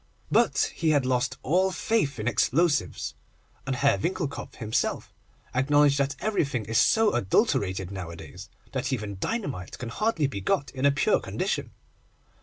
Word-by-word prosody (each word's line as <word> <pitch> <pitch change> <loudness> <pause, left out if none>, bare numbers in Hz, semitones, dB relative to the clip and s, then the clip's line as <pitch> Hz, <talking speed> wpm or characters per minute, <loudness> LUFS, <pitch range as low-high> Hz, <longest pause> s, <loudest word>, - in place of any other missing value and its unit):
But - - +3
he 165 - 0
had 145 -4 +3
lost 125 -1 0
all 185 +6 +2
faith 185 -8 0
in 105 +1 -3
explosives, 145 +4 +1 0.5
and 135 - 0
Herr 140 +2 +2
Winckelkopf 170 -4 -3
himself 110 -2 -2 0.4
acknowledged 140 +2 +4
that 140 0 0
everything 140 - -1
is 115 +2 +1
so 220 -2 +4
adulterated 95 - +1
nowadays, 90 0 -8 0.2
that 130 0 -2
even 105 -6 -3
dynamite 145 - -3
can 120 - -6
hardly 205 - 0
be 115 -8 -3
got 140 +8 0
in 135 +1 +1
a - - +5
pure 140 - +2
condition. - - -2
135 Hz, 145 wpm, -27 LUFS, 110-160 Hz, 0.5 s, a